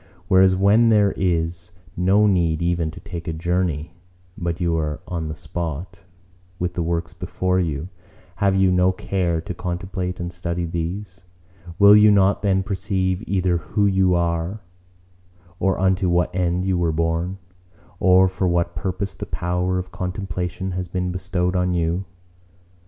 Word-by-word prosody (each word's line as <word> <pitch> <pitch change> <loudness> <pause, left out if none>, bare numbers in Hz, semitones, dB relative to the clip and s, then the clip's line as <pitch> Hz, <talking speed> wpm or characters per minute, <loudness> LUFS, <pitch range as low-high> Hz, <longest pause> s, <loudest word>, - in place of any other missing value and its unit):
Whereas 95 0 +5
when 105 +5 +4
there 105 -3 +4
is 85 -1 -1 0.3
no 95 +4 +3
need 85 -6 +2
even 85 -2 0
to 80 - -10
take 85 0 -8
a 85 - -2
journey, 85 -2 -1 0.4
but 85 -1 -3
you 85 -2 +1
are 75 -2 -2
on 85 -3 -3
the 75 - -5
spot, 85 +2 -5 0.6
with 90 -1 -2
the 85 - -2
works 85 0 -2
before 90 +1 -1
you, 80 -3 -2 0.5
have 100 -1 +2
you 95 -1 +4
no 90 +1 +3
care 90 -3 -1
to 85 - -6
contemplate 90 +1 -4
and 85 0 -4
study 85 0 -3
these? 90 +3 -5 0.6
Will 100 +1 +8
you 105 0 +7
not 100 -1 +3
then 95 -2 +2
perceive 95 -1 -1
either 90 -2 +1
who 100 +4 -1
you 95 -2 +3
are 85 +4 -1 1.0
or 95 -1 +1
unto 95 -1 +2
what 90 0 +1
end 90 0 0
you 95 -2 +1
were 85 -2 +1
born: 85 +3 -1 0.6
or 95 0 +5
for 95 0 -1
what 85 0 0
purpose 95 +1 -3
the - - -7
power 90 +3 -1
of 90 0 -5
contemplation 90 -1 -4
has 90 0 -3
been 90 +1 -2
bestowed 90 0 -1
on 90 0 +1
you? 85 +2 0
90 Hz, 155 wpm, -22 LUFS, 85-95 Hz, 1.0 s, Will